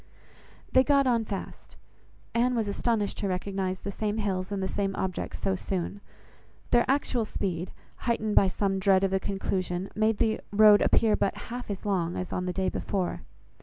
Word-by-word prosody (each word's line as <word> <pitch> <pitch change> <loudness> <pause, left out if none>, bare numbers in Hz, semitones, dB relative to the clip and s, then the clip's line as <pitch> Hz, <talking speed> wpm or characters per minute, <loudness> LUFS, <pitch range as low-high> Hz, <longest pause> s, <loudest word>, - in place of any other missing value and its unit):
They 260 - +6
got 280 0 +3
on 235 -3 +2
fast. 195 -2 -7 0.6
Anne 245 +2 +2
was 225 -3 0
astonished 210 0 -1
to 200 - -1
recognise 190 0 -2
the 200 - -4
same 210 +1 -2
hills 190 -3 -2
and 195 -1 -2
the - - 0
same 195 0 -2
objects 185 -1 -3
so 195 - 0
soon. 190 +1 -3 0.7
Their 240 0 +5
actual 265 -3 +1
speed, 185 -4 -3 0.3
heightened 220 -3 -1
by 195 - +6
some 195 0 0
dread 190 0 +4
of 195 - +2
the 190 - +2
conclusion, 190 -1 -2
made 215 0 +2
the 220 -1 +1
road 210 0 +7
appear 220 -2 +4
but 195 - 0 0.2
half 245 -2 -6
as 200 0 -5
long 180 -4 0
as 185 - -4
on 180 - -2
the - - 0
day 190 0 0
before. 190 -3 -2
200 Hz, 180 wpm, -28 LUFS, 190-220 Hz, 0.7 s, road